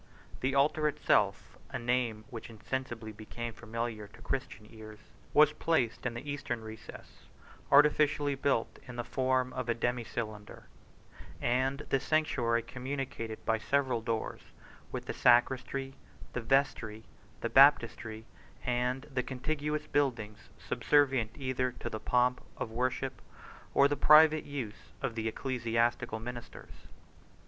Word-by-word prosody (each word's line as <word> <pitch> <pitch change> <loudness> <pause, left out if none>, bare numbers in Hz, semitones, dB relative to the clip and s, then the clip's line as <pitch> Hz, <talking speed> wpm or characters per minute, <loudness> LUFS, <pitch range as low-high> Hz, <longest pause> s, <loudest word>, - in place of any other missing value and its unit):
The 135 +1 0
altar 150 +2 +3
itself, 150 - +1
a - - -3
name 120 -3 -1
which 115 -1 -7
insensibly 115 0 -5
became 110 +2 -6
familiar 115 -2 -4
to 105 - -17
Christian 135 -5 -4
ears, 110 -1 -11 0.3
was 150 0 +6
placed 130 -8 0
in 120 - -4
the 125 +5 -7
eastern 145 -5 -3
recess, 110 0 -11 0.4
artificially 145 0 +5
built 135 -4 0
in 125 - -8
the 120 - -3
form 130 0 0
of 130 -2 -4
a 120 - +2
demi 120 +1 -1
cylinder; 110 -2 -6 0.8
and 130 +3 +1
this 135 - +2
sanctuary 120 -7 +1
communicated 125 -4 -5
by 110 0 +2
several 130 0 +1
doors 115 0 -3 0.5
with - - -4
the - - -3
sacristy, 130 +2 +2 0.4
the 125 - -2
vestry, 115 -3 +1 0.4
the - - -1
baptistery, 110 0 +4 0.4
and 125 +2 0
the 135 -4 -2
contiguous 150 +4 -3
buildings, 115 -8 -1
subservient 135 -6 +2
either 130 -2 -1
to 120 - -6
the 110 - -4
pomp 125 +3 +2 0.2
of 110 - -4
worship, 130 +2 -2 0.5
or 140 - +7
the 145 - 0
private 155 +2 +6
use 130 -8 -7
of 120 - -2
the 110 -1 -2
ecclesiastical 115 -1 -1
ministers. 120 +1 -8
125 Hz, 130 wpm, -31 LUFS, 115-135 Hz, 0.8 s, or